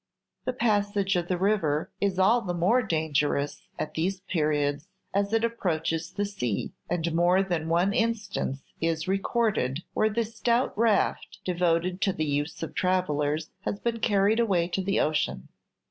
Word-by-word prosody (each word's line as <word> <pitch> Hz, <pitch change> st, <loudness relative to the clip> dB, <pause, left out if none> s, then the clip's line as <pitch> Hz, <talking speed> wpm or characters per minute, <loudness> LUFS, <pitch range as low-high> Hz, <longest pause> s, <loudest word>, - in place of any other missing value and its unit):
The 255 Hz, -, 0 dB
passage 205 Hz, -4 st, +1 dB
of 175 Hz, -1 st, 0 dB
the 180 Hz, -, 0 dB
river 175 Hz, -6 st, +1 dB
is 200 Hz, -2 st, +1 dB
all 220 Hz, +6 st, +4 dB
the 180 Hz, -5 st, -3 dB
more 190 Hz, +9 st, +3 dB
dangerous 150 Hz, -, -1 dB
at 155 Hz, -, -4 dB
these 185 Hz, +4 st, -1 dB
periods 150 Hz, -4 st, 0 dB, 0.3 s
as 200 Hz, +1 st, +1 dB
it 225 Hz, 0 st, +2 dB
approaches 165 Hz, -7 st, -1 dB
the 205 Hz, -, -1 dB
sea, 125 Hz, -, -3 dB, 0.2 s
and 170 Hz, -1 st, -1 dB
more 175 Hz, +3 st, +4 dB
than 170 Hz, -4 st, -2 dB
one 175 Hz, +4 st, +2 dB
instance 215 Hz, -12 st, -1 dB, 0.2 s
is 165 Hz, 0 st, 0 dB
recorded 195 Hz, -, 0 dB
where 215 Hz, -, +2 dB
the 230 Hz, +2 st, 0 dB
stout 235 Hz, +2 st, 0 dB
raft, 220 Hz, -2 st, +1 dB
devoted 180 Hz, +1 st, +1 dB
to 195 Hz, -, +2 dB
the 155 Hz, -, -1 dB
use 145 Hz, +2 st, -2 dB
of 165 Hz, -, -5 dB
travellers, 155 Hz, -4 st, 0 dB
has 200 Hz, -, -3 dB
been 235 Hz, -1 st, -1 dB
carried 205 Hz, +1 st, +3 dB
away 190 Hz, -7 st, +2 dB
to 190 Hz, -, -1 dB
the 195 Hz, +1 st, 0 dB
ocean. 70 Hz, -, 0 dB
180 Hz, 160 wpm, -27 LUFS, 160-205 Hz, 0.3 s, all